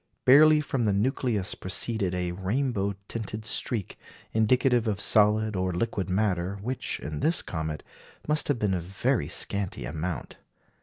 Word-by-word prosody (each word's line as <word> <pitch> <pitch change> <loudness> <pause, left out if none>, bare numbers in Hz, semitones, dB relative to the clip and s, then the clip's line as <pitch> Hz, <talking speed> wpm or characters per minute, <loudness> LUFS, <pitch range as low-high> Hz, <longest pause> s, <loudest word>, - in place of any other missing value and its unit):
Barely 150 +3 +7
from 135 -5 -1
the 105 - +2
nucleus 105 -2 0
proceeded 95 0 0
a 90 -1 -2
rainbow 100 +2 -1
tinted 110 -1 -4
streak, 110 -2 -2 0.3
indicative 120 +1 +3
of 100 -2 -1
solid 105 0 +3
or 95 0 0
liquid 95 -1 -2
matter, 95 -1 0
which, 130 +3 -3
in 75 0 -5
this 165 +2 +1
comet, 80 -2 -4 0.4
must 150 0 +2
have 145 - +1
been 105 -4 0
of 90 - -1
very 95 - -1
scanty 100 +3 -2
amount. 80 -2 -5
105 Hz, 145 wpm, -27 LUFS, 90-120 Hz, 0.4 s, Barely